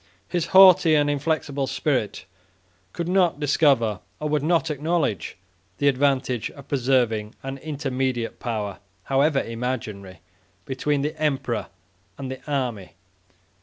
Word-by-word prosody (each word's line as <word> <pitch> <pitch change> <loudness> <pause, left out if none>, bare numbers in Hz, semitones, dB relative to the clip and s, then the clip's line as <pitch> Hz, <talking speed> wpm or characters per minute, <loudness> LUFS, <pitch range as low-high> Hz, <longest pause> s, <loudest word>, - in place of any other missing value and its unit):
His 175 -3 -1
haughty 185 -4 +7
and 145 -1 +3
inflexible 145 -2 -1
spirit 130 -4 -1 0.7
could 170 - -4
not 180 -4 +2
discover, 135 - +2 0.2
or 150 - -2
would 150 -1 +1
not 160 +1 +1
acknowledge, 150 - -1 0.4
the 145 - +1
advantage 135 -3 +1
of 140 -2 -14
preserving 120 -5 +1
an 135 0 -5
intermediate 130 -5 -3
power, 105 -5 -3 0.2
however 140 +1 +2
imaginary, 110 -6 -5 0.4
between 140 +2 -1
the 150 +2 -2
emperor 135 -5 -1 0.5
and 135 -1 -5
the 130 - -7
army. 125 -9 -2
135 Hz, 120 wpm, -24 LUFS, 125-150 Hz, 0.7 s, haughty